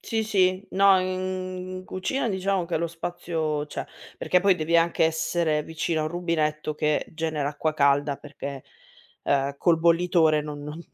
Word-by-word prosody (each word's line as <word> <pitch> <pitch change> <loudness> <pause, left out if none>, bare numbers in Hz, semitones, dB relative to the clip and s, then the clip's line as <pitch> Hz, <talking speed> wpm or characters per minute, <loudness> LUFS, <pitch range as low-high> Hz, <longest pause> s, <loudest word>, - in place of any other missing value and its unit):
Sì, 225 -1 -2
sì. 190 -2 +2
No 195 0 +5
in 185 0 -4
cucina 190 +9 -2
diciamo 190 -2 0
che 170 - -2
lo 170 +1 0
spazio 165 -2 -3
c'è, - - -5 0.3
perché 180 - +2
poi 195 0 +4
devi 165 0 +1
anche 165 0 +3
essere 160 -1 0
vicino 160 0 -2
a - - 0
un 155 - -1
rubinetto 155 -3 -1
che 150 0 0
genera 155 -3 -2
acqua 155 +1 -2
calda 140 0 +2
perché, 140 -2 -8 0.6
ehm, 140 0 +1
col 170 -2 +3
bollitore 165 -2 +3
non 150 -1 -7
non 150 +3 -7
165 Hz, 160 wpm, -25 LUFS, 150-185 Hz, 0.6 s, No